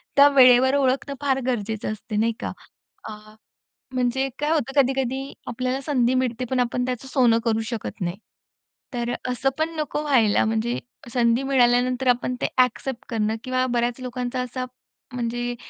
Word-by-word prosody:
त्या 280 0 +8
वेळेवर 255 0 +7
ओळखणं 275 +1 +1
फार 270 -2 +1
गरजेचं 220 -3 -2
असतं 215 0 -4
नाही 230 +1 +2
का? - - -3 0.6
अ, - - -6 0.8
म्हणजे 255 +1 0
काय 295 - 0
होतं 285 -3 +3
कधी-कधी 265 +1 -2
आपल्याला 255 +2 -2
संधी 255 -3 +1
मिळते 255 -1 -1
पण 260 - 0
आपण 245 0 0
त्याचं 255 +1 -4
सोनं 245 -4 +3
करू 225 -1 +1
शकत 230 -2 -5
नाही. 175 +1 -2 0.8
तर 240 0 -2 0.2
असं 250 +2 +1
पण 315 +1 0
नको 300 -1 -2
व्हायला 245 -8 +3
म्हणजे 225 +2 -1 0.3
संधी 235 +1 +2
मिळाल्यानंतर 250 -1 +2
आपण 250 0 +2
ते - - +2
ॲक्सेप्ट 250 0 0
करणं 220 -1 0
किंवा 255 0 0
बऱ्याच 240 0 0
लोकांचा 250 0 -3
असा 250 +1 -4 0.5
म्हणजे 240 0 -2
250 Hz, 155 wpm, -23 LUFS, 235-265 Hz, 0.8 s, त्या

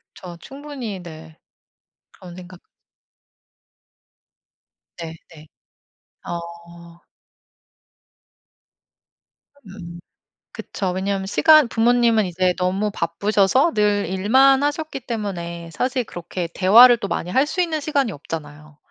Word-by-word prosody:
저 175 -2 -10
충분히 265 - -8
네 160 -1 -12 0.7
그런 180 -3 -13
생각 180 0 -12 2.4
네 165 -1 -7 0.2
네. 155 0 -15 0.8
어. 170 0 -9 2.7
음. 175 -3 -10 0.5
그쵸 190 -2 -5
왜냐면 190 +1 -3
시간 310 +4 +5
부모님은 230 -1 +2
이제 180 0 0
너무 190 +3 -1
바쁘셔서 200 - +1
늘 205 -2 +1
일만 265 +9 +3
하셨기 295 -1 -3
때문에 175 -8 -6
사실 250 - -2
그렇게 175 -3 -6
대화를 235 +6 +7
또 200 - -5
많이 175 - -4
할 265 +7 +2
수 365 +4 -2
있는 325 -3 -1
시간이 280 -6 -1
없잖아요. 150 -1 -9
195 Hz, 200 characters per minute, -21 LUFS, 170-245 Hz, 2.7 s, 대화를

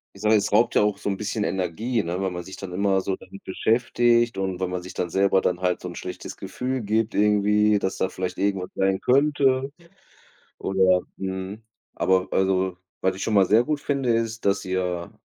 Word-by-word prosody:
Ich 100 - -13
sage 110 0 +3
mal, 110 - +7
es - - -2
raubt - - +3
ja - - +5
auch 105 0 +1
so - - -7
'n 100 - 0
bisschen 105 +1 -2
Energie, 100 +6 -1
ne, 85 +2 -3
weil 95 -1 -1
man 90 -1 -5
sich 95 - -10
dann 95 -2 -7
immer 95 0 +2
so 95 0 -2
damit 95 - -14
beschäftigt 120 +2 +2
und 95 -2 -2
weil 95 - 0
man 90 0 -3
sich 90 - -9
dann 90 - -2
selber 95 +2 +3
dann 90 -1 -1
halt 90 -1 +1
so 90 - -7
'n 85 - -7
schlechtes 90 - -7
Gefühl 130 0 -4
gibt 110 +1 0
irgendwie, 105 0 +3
dass 95 - -2
da 95 - 0
vielleicht 90 -1 -4
irgendwas 95 -1 -1
sein 95 0 +1
könnte 135 0 +2 0.9
oder, 95 -1 +2 0.2
mhm. 95 +2 -5 0.3
Aber 95 +1 +1
also, 95 -1 +1 0.3
was 95 - +1
ich 95 - -8
schon 110 - 0
mal 95 -2 +6
sehr 110 +5 +4
gut 150 +1 -1
finde, 140 -4 0
ist, 115 -1 -3
dass 100 0 +1
ihr 90 -2 -2
95 Hz, 210 wpm, -24 LUFS, 95-110 Hz, 0.9 s, mal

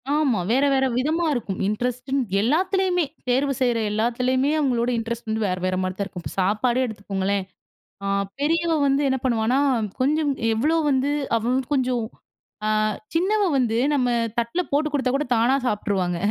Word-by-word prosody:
ஆமா. 270 -10 +2
வேற, 270 +3 +3
வேற 265 0 +2
விதமா 315 +6 +1
இருக்கும். 220 -7 -3
இன்ட்ரெஸ்ட்டுன்னு 250 +5 -1 0.2
எல்லாத்துலேயுமே 360 - +1 0.2
தேர்வு 275 +2 +2
செய்ற 245 -2 +2
எல்லாத்துலயுமே! 250 +5 +1
அவுங்களோட 245 -4 +1
இன்ட்ரெஸ்ட் 230 0 -4
வந்து 220 0 -1
வேற, 185 -1 -1
வேறமாரி 185 0 -1
தான் 200 - -1
இருக்கும். 180 -3 -9
இப்ப 140 - -6
சாப்பாடே 235 +6 +1
எடுத்துக்கோங்களேன்! 200 -3 -2 0.6
ஆ - - -2 0.3
பெரியவ 330 +3 +1
வந்து 275 +1 +2
என்ன 265 0 +1
பண்ணுவான்னா, 235 +1 +1 0.4
கொஞ்சம் 295 +2 +2 0.2
எவ்வளோ 300 +9 +1
வந்து 270 +1 +1 0.3
அவ 225 - -1
வந்து 260 0 -1
கொஞ்சம் 250 -3 0 0.6
ஆ - - +1 0.5
சின்னவ 405 +5 +2
வந்து 230 -3 +1 0.2
நம்ம 250 -3 +1 0.3
தட்ல 235 +10 -1
போட்டு 300 +2 +1
கொடுத்தாகூட 275 +1 +1
தானா 240 +4 +3
சாப்பிட்டுருவாங்க 195 -5 -1
250 Hz, 145 wpm, -23 LUFS, 220-285 Hz, 0.6 s, வேற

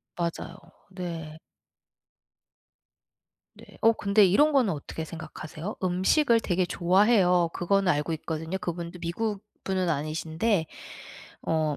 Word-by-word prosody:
맞아요. 170 0 -3 0.4
네. 165 -4 -6 2.1
네. - - -15 0.2
어 225 - +6
근데 205 -1 +3
이런 290 +12 +4
거는 255 -8 +3
어떻게 155 +2 -6
생각하세요? 160 +3 -7
음식을 210 - +3
되게 185 -4 0
좋아해요. 180 -1 +3
그거는 195 +1 +2
알고 150 +2 -1
있거든요. 160 +3 -4
그분도 170 0 -5
미국 200 +4 -3 0.2
분은 185 -2 0
아니신데 160 +5 0 0.8
어 155 -2 0
175 Hz, 255 characters per minute, -27 LUFS, 160-200 Hz, 2.1 s, 어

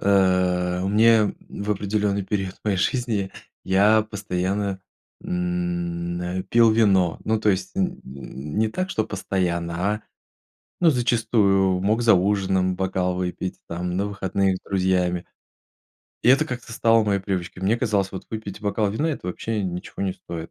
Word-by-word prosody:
а, 90 -2 +2
мне 110 +1 +4
в 100 +1 -5
определенный 100 0 0
период 95 -1 -2
моей 105 -3 +1
жизни 110 -2 0 0.3
я 105 +3 +4
постоянно, 100 -1 -2 0.4
м, 85 -1 -2
э, 90 +1 -3
пил 115 -1 +5
вино. 95 -6 +3
Ну, 110 0 +1
то 105 - +3
есть 95 - -2
н 185 -2 -1
н 70 +4 -7
не 110 0 +3
так, 185 +11 -3
что 110 - 0
постоянно, 90 -4 -2 0.2
а, 105 - -8 0.8
ну, 170 -2 +6
зачастую 105 -7 +2
мог 110 +5 +1
за 115 -2 +6
ужином 95 -1 +1
бокал 95 -1 0
выпить, 90 0 -3
там, 90 +1 -3
на 100 +2 0
выходных 95 -1 0
с - - -10
друзьями. 90 -2 +1 1.0
И - - +5
это 135 - +4
как-то 125 -2 -6
стало 115 -1 +3
моей 100 -2 +1
привычкой. 95 -1 -4
Мне 105 +5 +2
казалось, 105 -5 0
вот 95 - -8
выпить 110 -2 -6
бокал 105 0 0
вина- 150 +10 0
это 140 - -5
вообще 105 +3 -2
ничего 90 +1 -5
не 95 -2 -1
стоит. 85 -3 -8
95 Hz, 150 wpm, -23 LUFS, 90-110 Hz, 1.0 s, ну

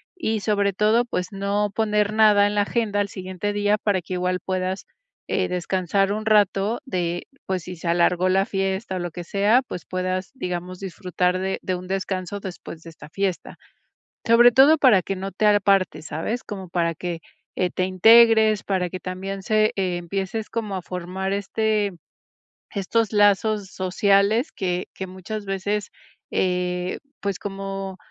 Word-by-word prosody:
Y 225 -11 -1
sobre 200 -2 +1
todo, 215 +4 +3
pues 180 -6 -2
no 200 +1 -1
poner 210 -1 +1
nada 210 -2 +5
en 205 - -3
la 205 - +3
agenda 205 -1 0
al 200 - -1
siguiente 190 +2 -4
día 205 0 +2
para 205 -3 0
que 175 - -7
igual 180 0 -1
puedas, 185 - -2 0.4
eh, 185 -1 0
descansar 185 +2 0
un 215 +1 -4
rato 210 0 +2
de 175 -6 -2 0.2
pues 185 -2 -2
si 180 +1 -7
se 170 0 -4
alargó 175 +2 +2
la 195 +1 +3
fiesta 195 -1 -2
o - - -2
lo 175 -1 -4
que 175 +1 -7
sea, 205 +7 +3
pues 180 - -7
puedas, 185 0 -3
digamos, 180 -6 -5
disfrutar 180 -1 -1
de 190 +1 -2
de 185 - -2
un 180 0 -8
descanso 190 0 -3
después 175 -4 -8
de 165 - -10
esta 155 -2 -13
fiesta. 195 0 -3 0.7
Sobre 240 +1 +7
todo 275 +6 +6
para 250 -10 +5
que 195 - -4
no 195 +1 -5
te 215 - -1
apartes, 195 -6 +2
¿sabes? 220 +10 -3
Como 190 -3 -7
para 170 -1 0
que 170 -1 -5 0.3
eh, 180 -1 +1
te 185 - -1
integres, 220 +2 +6
para 185 -3 -1
que 185 +1 -6
también 190 +1 -5
se 215 +1 +2
empieces 190 +3 -2
como 215 -4 -3
a 185 - -3
formar 185 +2 -4
este 205 0 0 0.8
estos 215 +2 0
lazos 205 0 +3
sociales 200 - +1
que 180 -1 -2
que 190 - -6
muchas 190 +3 -6
veces, 200 +2 -2 0.4
eh 180 0 -1 0.2
pues 200 -2 -2
como, 195 -1 -5
195 Hz, 165 wpm, -23 LUFS, 185-210 Hz, 0.8 s, Sobre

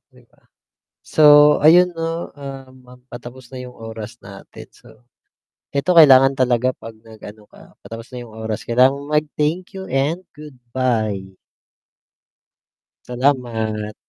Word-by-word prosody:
'Di - - -21
ba. - - -31 0.6
So, 155 - +1 0.4
ayun 180 +3 +6
'no, 165 +1 -4
um 135 -2 -10 0.4
patapos 120 +1 -11
na 130 - -9
yung 125 - -12
oras 110 0 -9
natin, 100 0 -13
so - - -20 0.8
eto 155 +6 0
kailangan 135 -4 +7
talaga 130 -1 0
pag 115 - -11
nag-ano 110 -1 -14
ka, - - -18
patapos 115 +2 -11
na 125 - -7
yung 110 - -16
oras, 110 -1 -6
kailangan 125 +3 +4
mo 140 +1 -9
mag 150 - +3 0.2
thank 165 +5 -1
you 190 0 -8
and 145 +7 -1
goodbye. 125 -7 -3 1.8
Salamat, 115 -5 -2
130 Hz, 130 wpm, -19 LUFS, 115-145 Hz, 1.8 s, kailangan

